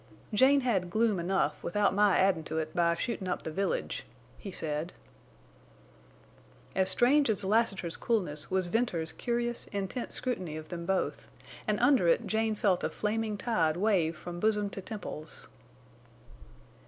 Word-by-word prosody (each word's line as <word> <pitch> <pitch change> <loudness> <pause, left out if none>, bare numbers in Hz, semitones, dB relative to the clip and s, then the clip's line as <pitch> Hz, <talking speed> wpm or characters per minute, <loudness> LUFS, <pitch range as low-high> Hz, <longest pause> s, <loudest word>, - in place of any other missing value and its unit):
"Jane 270 +5 +5
had 195 -8 0
gloom 215 -1 +2
enough 190 +3 0
without 205 +4 +1
my 205 0 +4
addin' 190 -4 +3
to 160 - -3
it 155 -1 -3
by 170 -1 +3
shootin' 195 -1 -3
up 180 - -2
the 160 - -4
village," 195 +5 -2 0.4
he 200 - -7
said. 155 0 -3 1.8
As 190 0 +2
strange 265 +7 +4
as 210 -2 +2
Lassiter's 195 -4 +1
coolness 175 -10 -1
was 190 -1 +1
Venters's 175 -5 +1
curious, 240 0 -2
intent 200 +4 -4
scrutiny 185 -11 -3
of 155 0 -9
them 170 -1 -6
both, 190 -1 -1 0.4
and 210 -1 +1
under 245 -7 +4
it 195 +7 +3
Jane 220 +1 0
felt 195 -4 +1
a - - +1
flaming 215 0 -2
tide 170 -8 +1
wave 180 -5 +2
from 175 +2 -7
bosom 210 0 +1
to 195 - -6
temples. 185 -7 -7
195 Hz, 150 wpm, -30 LUFS, 170-220 Hz, 1.8 s, Jane